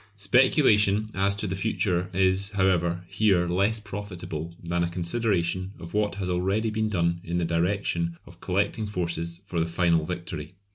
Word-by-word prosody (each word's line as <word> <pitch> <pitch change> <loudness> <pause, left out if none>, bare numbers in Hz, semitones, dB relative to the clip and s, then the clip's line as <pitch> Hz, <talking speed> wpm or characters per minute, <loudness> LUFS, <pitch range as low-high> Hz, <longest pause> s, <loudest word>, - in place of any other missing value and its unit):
Speculation 105 -2 +4
as 100 +1 +1
to 100 - -2
the 95 -2 -2
future 95 -3 0
is, 95 +1 +2
however, 90 -2 +1
here 95 -2 +2
less 100 +6 +2
profitable 90 -5 -6
than 85 0 0
a 85 - 0
consideration 95 0 -1
of 85 -1 -10
what 105 -1 +1
has 95 -2 -3
been 90 -1 0
already 100 +5 0
done 90 -6 0
in 85 +1 -2
the 90 - +1
direction 85 0 0
of - - -15
collecting 110 -1 0
forces 85 -3 -3
for 90 -3 -3
the 80 - +1
final 85 -1 +2
victory. 85 -1 -6
95 Hz, 160 wpm, -26 LUFS, 85-100 Hz, -, Speculation